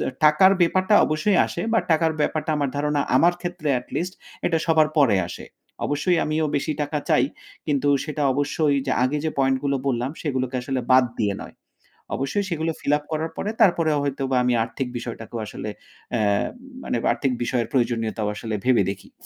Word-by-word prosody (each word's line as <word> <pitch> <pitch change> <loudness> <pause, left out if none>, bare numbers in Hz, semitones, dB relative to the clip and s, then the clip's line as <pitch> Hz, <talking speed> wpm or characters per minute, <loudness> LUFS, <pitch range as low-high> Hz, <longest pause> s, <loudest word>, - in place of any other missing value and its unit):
হ্যাঁ, 130 - -4
টাকার 155 +6 +6
ব্যাপারটা 185 +4 +3
অবশ্যই 155 +6 +1
আসে 170 - -4
বা 230 - +4
টাকার 160 0 +3
ব্যাপারটা 155 +1 0
আমার 145 -2 0
ধারণা 150 0 0 0.2
আমার 175 +1 +4
ক্ষেত্রে 175 -3 -4
atleast 175 +8 -4 0.3
এটা 165 -2 +2
সবার 160 -2 +4
পরে 125 -9 +5
আসে। - - -8 0.4
অবশ্যই 155 +5 +1
আমিও 155 +1 0
বেশি 155 +2 -1
টাকা 145 +1 -2
চাই। - - +4 0.4
কিন্তু 145 -1 +1 0.2
সেটা 150 -1 -3
অবশ্যই 145 +1 +1
যে 130 - +1
আগে 130 +4 0
যে 160 - +1
পয়েন্টগুলো 135 +1 +1
বললাম 125 -1 0
সেগুলোকে 130 -4 -2
আসলে 130 +1 -2
বাদ 130 0 +7
দিয়ে 105 -3 +1
নয়। - - -11 0.6
অবশ্যই 135 +10 -1
সেগুলো 165 -1 -1
fill 145 - 0
up 150 - -13
করার 160 +1 -2
পরে 205 - -2
তারপরেও 165 -7 +4
হয়তোবা 135 -2 -1
আমি 125 0 +2
আর্থিক 125 +3 -4
বিষয়টাকেও 115 -1 -6
আসলে 105 - -6 0.4
অ্যা 120 - +1 0.6
মানে - - -1
আর্থিক 130 +3 0
বিষয়ের 120 -1 -1
প্রয়োজনীয়তাও 115 -4 0
আসলে 110 +1 -4
ভেবে 125 -5 +4
দেখি। 100 0 -11
145 Hz, 170 wpm, -23 LUFS, 130-160 Hz, 0.6 s, বাদ